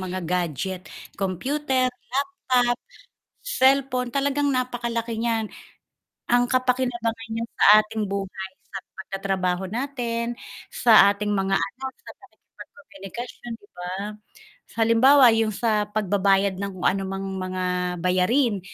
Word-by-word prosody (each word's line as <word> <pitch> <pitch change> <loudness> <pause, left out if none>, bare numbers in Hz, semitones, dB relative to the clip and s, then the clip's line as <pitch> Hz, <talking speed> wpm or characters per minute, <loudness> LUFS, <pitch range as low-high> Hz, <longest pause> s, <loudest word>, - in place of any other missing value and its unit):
mga 185 0 -4
gadget, 180 +1 -2 0.3
computer, 260 - 0
laptop, 255 -3 0 0.6
cellphone, 265 - +2
talagang 285 +1 +1
napaka-laki 235 -2 -2
n'yan. 225 -1 -1 0.8
Ang 245 0 +4
kapakinabangan 245 -3 0
n'yan 230 +1 -3
sa - - 0 0.2
ating 215 0 -2
buhay 195 -1 -4 0.2
sa - - -7 0.2
pag-ta-trabaho 190 -2 -2
natin, 240 -2 -3 0.3
sa 240 - +1 0.2
ating 210 0 -2
mga 195 -1 +1
anak, 265 +7 -3
sa - - -10
pakikipag-komukasyon, 240 -1 -11
'di 205 - -19
ba? 180 0 -5 0.9
Halimbawa 250 +5 +6
yung 220 -1 +1
sa 215 -2 +1
pagbabayad 200 -1 +1
ng 195 -2 -5
anumang 195 0 0 0.2
mga 185 0 -3 0.4
bayarin, 200 +5 +2
225 Hz, 105 wpm, -24 LUFS, 195-250 Hz, 0.9 s, Halimbawa